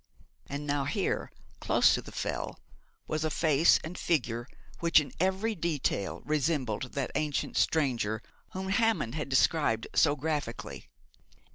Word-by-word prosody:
And 145 +1 -5
now 145 -1 0
here, 140 - -1 0.3
close - - +4
to - - 0
the - - -11
Fell, - - -4 0.5
was 155 0 -1
a 155 - +1
face 155 0 +4
and 160 +3 -6
figure 120 -9 -1 0.3
which 170 -1 +5
in 140 -4 -4
every 190 +5 +1
detail 155 - -1
resembled 140 -6 -1
that 140 -2 -2
ancient 150 -2 -1
stranger 120 -8 +1 0.3
whom 190 0 -4
Hammond 195 - +1
had 150 -2 -3
described 130 -4 +2
so 145 -2 +4
graphically. 145 -5 -4
150 Hz, 135 wpm, -30 LUFS, 130-165 Hz, 0.5 s, which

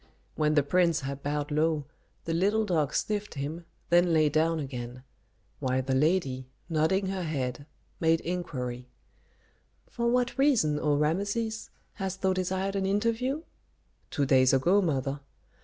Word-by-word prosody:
When 155 0 +1
the 145 - +4
prince 170 +1 +2
had 140 0 -5
bowed 145 +1 -2
low, 155 -1 +1 0.4
the 165 - -1
little 205 +6 +2
dog 160 -8 0
sniffed 210 -3 -2
him, 150 +5 -4 0.3
then 175 0 +5
lay 155 -1 +4
down 160 +2 +2
again; 125 -3 -6 0.6
while 130 -1 0
the 130 +1 -1
lady, 135 -3 +1 0.2
nodding 165 +4 +1
her 190 -1 -2
head, 140 -4 -3 0.3
made 165 0 +3
inquiry, 130 -9 -4 1.0
"For 235 0 -2
what 250 +2 +1
reason, 220 - +3
O 150 -1 +2
Rameses, 200 +9 -1 0.2
hast 190 -1 -5
thou 190 0 +3
desired 190 +1 -1
an 195 -1 0
interview?" 230 +9 0 0.7
"Two 140 - 0
days 130 -1 +4
ago, 175 +10 +4
mother." 140 -5 -1
160 Hz, 140 wpm, -28 LUFS, 140-190 Hz, 1.0 s, then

